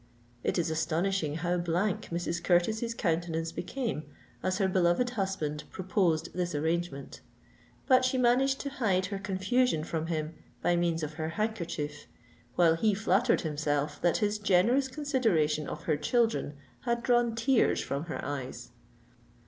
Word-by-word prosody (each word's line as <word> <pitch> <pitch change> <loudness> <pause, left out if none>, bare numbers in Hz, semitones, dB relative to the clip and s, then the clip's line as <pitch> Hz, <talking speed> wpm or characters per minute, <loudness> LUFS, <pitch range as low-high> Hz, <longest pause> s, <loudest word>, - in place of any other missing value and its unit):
It - - 0
is 165 -2 0
astonishing 160 0 0
how 175 +2 0
blank 175 +3 0
Mrs. 170 0 -2
Curtis's 220 +6 +1
countenance 165 -4 -1
became 225 - -3 0.4
as 185 0 0
her 195 -2 +2
beloved 185 +6 +2
husband 190 -9 -2
proposed 185 -4 0
this 175 -3 -2
arrangement: 160 -2 -2 0.6
but 255 -1 +5
she 255 +1 +1
managed 255 +2 +3
to 280 - -4
hide 195 -9 +1
her 195 - -3
confusion 195 0 +1
from 160 0 -3
him 155 -1 -2 0.3
by 175 - +3
means 170 -2 0
of 155 0 -4
her 155 - -1
handkerchief, 170 -7 -3 0.5
while 170 -2 +5
he 205 +5 +2
flattered 220 +3 +2
himself 150 -1 -1
that 175 -2 +3
his 210 0 0
generous 210 +7 +3
consideration 225 - +1
of 155 - -6
her 155 -3 +1
children 225 - +1 0.3
had 235 -1 0
drawn 240 -2 +2
tears 230 +2 +3
from 140 +3 -3
her 165 - -5
eyes. 135 -2 -5
180 Hz, 145 wpm, -30 LUFS, 160-225 Hz, 0.6 s, but